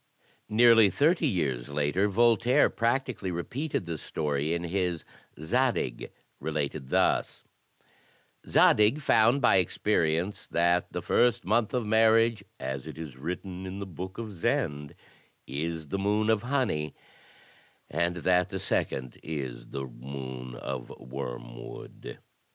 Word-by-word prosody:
Nearly 115 -1 +6
thirty 155 - +2
years 70 - -1
later 75 +7 +1
Voltaire 120 +4 +4
practically 120 -4 -1
repeated 105 - -3
the 85 -2 -4
story 75 0 -2
in 85 - -3
his 90 -2 -1 0.4
"Zadig," 115 - 0 0.3
related 75 -3 -3
thus: - - +1 1.1
Zadig 105 +7 +5
found 125 -1 +3
by 110 - +6
experience 90 -1 0
that 85 +1 +1
the - - -4
first 120 -1 +2
month 110 +2 +2
of 125 -3 -1
marriage, 110 0 +4 0.2
as 65 +2 -4
it 80 -2 -8
is 80 -5 -7
written 90 +6 -5
in 95 +1 -6
the 100 - -4
book 95 +1 -7
of 115 -2 -5
Zend, 85 - -1 0.5
is 80 +2 -4
the 100 - -2
moon 105 +2 +2
of 110 -2 +2
honey, 120 - -1 0.9
and 85 +3 0
that 90 -1 +3
the - - -4
second 65 -2 -2
is 65 -6 -5
the 70 +1 -5
moon 65 0 -7
of 60 0 -5
wormwood. - - -8
90 Hz, 125 wpm, -28 LUFS, 70-110 Hz, 1.1 s, Nearly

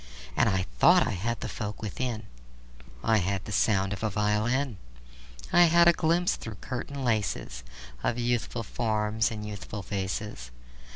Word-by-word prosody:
And - - +4
I 95 -2 0
thought - - +6
I - - -1
had 115 +5 -2
the - - -3
folk 105 -1 -5
within: 115 +1 -3 0.8
I 110 0 +4
had 95 0 -1
the - - -6
sound 100 -1 +2
of 100 - -6
a 110 - +1
violin; 105 +4 0 0.7
I 175 0 +8
had 170 +1 +6
a 170 - +8
glimpse 170 +2 +1
through 110 -2 -7
curtain 135 +3 -5
laces 105 - -1 0.4
Of 120 - 0
youthful 120 -1 -1
forms 110 -1 0
and 105 -2 -6
youthful 105 -1 -6
faces. 95 - -4
110 Hz, 155 wpm, -28 LUFS, 100-120 Hz, 0.8 s, I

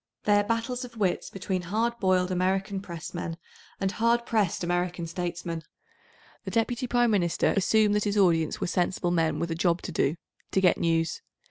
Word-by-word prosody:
They 205 -1 +4
are - - +2
battles 230 +4 -2
of 240 -2 -10
wits 195 -4 0
between 190 -1 -3
hard 225 +6 -1
boiled 185 -1 +2
American 190 +2 0
Pressmen 170 -2 -6 0.4
and 195 -1 0
hard 235 +2 +1
pressed 210 -7 0
American 175 0 -1
statesmen. 170 -1 -4 0.8
The - - -5
Deputy 240 +2 0
Prime 240 -1 +3
Minister 175 -5 +2
assumed 210 +2 +3
that 210 0 +1
his 205 0 0
audience 165 -5 +3
were - - -1
sensible 175 0 0
men 160 -3 +1
with 170 +2 -2
a - - +1
job 170 +1 +1
todo—to 170 +2 -2
get 185 -2 +3
news. 165 -1 0
185 Hz, 165 wpm, -27 LUFS, 170-210 Hz, 0.8 s, They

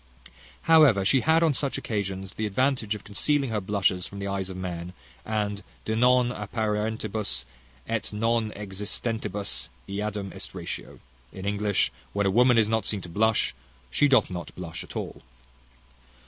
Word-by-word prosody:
However, 150 -12 +6
she 130 +5 +4
had, 160 +3 +4
on 160 -3 +4
such 140 +1 -1
occasions, 95 -3 -3
the 110 - -2
advantage 115 0 +1
of 105 - -9
concealing 135 +5 +1
her 105 -2 0
blushes 95 -2 +1
from 100 - -10
the 100 - -4
eyes 95 -1 -2
of 95 - -6
men; 90 -1 -5 0.3
and 105 -2 -1 0.2
De 110 - 0
non 125 +1 +4
apparentibus, 105 - -2 0.4
et 115 -1 -1
non 115 +1 +1
existentibus 100 - -2 0.2
eadem 100 -1 -3
est - - -7
ratio - - -6 0.3
in 95 - -8
English, 100 -1 +1 0.2
"When 100 0 +1
a 95 - +3
woman 125 +3 +5
is 110 -2 +5
not 110 0 0
seen 105 -3 -1
to 90 - -8
blush, 110 +5 +2 0.4
she 145 - +4
doth 130 -8 +4
not 90 -1 -6
blush 90 +1 -6
at 90 - -12
all." - - -5
105 Hz, 160 wpm, -27 LUFS, 95-115 Hz, 0.4 s, However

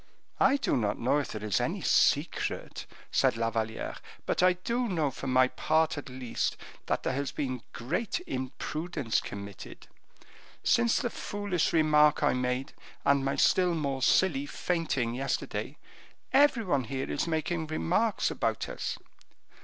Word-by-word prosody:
"I 270 +1 +5
do - - 0
not 105 -4 0
know 130 +5 +2
if 145 - -4
there 105 -1 -6
is 105 -3 +1
any - - -2
secret," - - +1 0.2
said - - +3
La 115 0 0
Valliere; 110 0 -3 0.3
"but - - 0
I 185 0 +6
do 235 +7 -2
know, 160 -7 0
for 135 - -7
my 130 0 +5
part 160 +4 +1
at 145 -2 -7
least, 125 -2 -2 0.3
that - - 0
there - - 0
has 140 +1 -2
been 130 -4 -3
great 170 - -2
imprudence 135 +1 -2
committed. 100 -1 -8 0.8
Since 235 0 +3
the 245 -4 -1
foolish 205 -5 -1
remark 150 -2 +4
I 145 - +4
made, 125 +1 -2 0.3
and 140 -1 +4
my 135 +1 0
still 180 -2 +3
more 140 -4 -2
silly 145 0 +3
fainting 150 -9 -1
yesterday, 135 +3 -3 0.6
every 275 -4 +5
one 140 - 0
here 135 +3 -3
is 145 - -1
making 160 0 -1
remarks 185 +8 +1
about - - -1
us." - - -4
145 Hz, 150 wpm, -29 LUFS, 130-175 Hz, 0.8 s, I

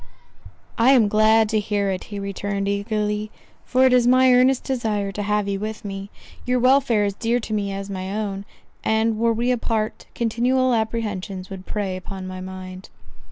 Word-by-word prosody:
"I 250 +4 +6
am 235 -5 +5
glad 215 +1 +4
to 215 -1 +2
hear 205 -1 -1
it," 185 - -4
he 205 - -7
returned 200 0 -3
eagerly, 210 +1 -1 0.4
"for 260 +1 +3
it 260 - +4
is 245 -1 +4
my 255 0 +5
earnest 255 +1 +4
desire 215 -6 -1
to 205 - -4
have 210 0 0
you 195 -1 -2
with 215 +1 -5
me—your 200 +5 -5
welfare 255 -4 +3
is 200 - -1
dear 235 +4 0
to 220 - -5
me 200 -2 -1
as 195 0 -5
my 190 -1 -5
own; 200 -1 -3 0.4
and 220 0 +1
were 230 0 +3
we 235 +2 0
apart, 225 -3 -2
continual 245 +3 +1
apprehensions 210 -4 -3
would 190 -1 -8
prey 200 -3 -2
upon 185 +1 -7
my 185 0 -6
mind." 185 0 -8
210 Hz, 175 wpm, -22 LUFS, 195-230 Hz, 0.4 s, I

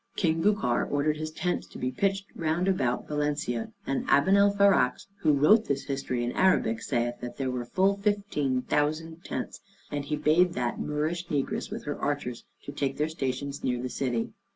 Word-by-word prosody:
King 165 -3 +1
Bucar 200 - +2
ordered 150 +1 +1
his 155 0 -3
tents 175 +3 -2
to - - -11
be 125 - -2
pitched 195 +7 0
round 165 +3 0
about 130 -11 0
Valencia, 145 -6 -1
and 135 - -1
Abenalfarax, 200 -4 +4
who 155 - +3
wrote 175 +11 +5
this 140 -1 -1
history 135 -3 -2
in 120 - -1
Arabic, 125 -12 +2
saith 120 -2 -1
that 120 - -6
there 130 -2 -1
were 125 -1 -3
full 195 +9 +2
fifteen 200 -11 0
thousand 160 +3 -1
tents; - - -5 0.3
and 145 -1 -3
he 150 - -1
bade 160 +4 +3
that 120 -1 -2
Moorish 155 +4 -2
negress 145 -5 -2
with - - -6
her 145 - -4
archers 140 -4 -2 0.2
to - - -6
take 140 -1 -2
their 150 +1 0
station 140 -2 -3
near 125 -1 0
the 125 +1 -3
city. 120 -3 -2
150 Hz, 175 wpm, -28 LUFS, 130-175 Hz, 0.3 s, wrote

